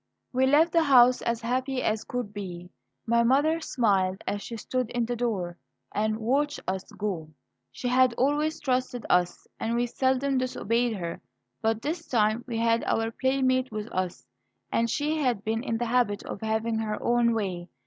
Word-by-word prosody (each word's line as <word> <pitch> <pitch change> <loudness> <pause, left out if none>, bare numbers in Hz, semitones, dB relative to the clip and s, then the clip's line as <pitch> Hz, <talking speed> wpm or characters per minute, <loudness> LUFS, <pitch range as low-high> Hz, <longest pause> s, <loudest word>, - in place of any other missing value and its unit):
We 260 +1 +3
left 310 +5 +5
the 335 - +4
house 255 -4 +6
as 235 0 -1
happy 255 +2 -1
as 215 0 0
could 245 -4 -4
be. 180 -3 -7 0.3
My 235 0 +3
mother 285 +7 +3
smiled 195 - +1
as 205 - -2
she 230 - -6
stood 255 +2 -2
in 240 -1 -1
the 240 +1 -2
door 195 -8 -2 0.3
and 215 +1 0
watched 280 +7 0
us 190 0 -3
go. 185 -7 -3 0.4
She 250 - -5
had 250 -1 +4
always 295 +5 +1
trusted 255 -3 -1
us, 180 0 +2
and 230 +1 -1
we 240 +1 +2
seldom 260 +2 +1
disobeyed 240 -2 0
her. 170 -2 -5 0.4
But 225 +1 0
this 320 +3 -3
time 220 -1 +2
we 235 -3 -3
had 230 0 +2
our 225 0 0
playmate 260 0 +1
with 215 +1 -5
us, 185 -1 -3 0.5
and 230 - +2
the 300 +5 0
had 250 -8 0
been 225 +1 -1
in 230 -3 -2
the 240 - -1
habit 235 -4 +1
of - - -6
having 220 +1 0
her 215 -1 -2
own 235 -1 +3
way. 185 -5 -3
235 Hz, 180 wpm, -27 LUFS, 215-255 Hz, 0.5 s, house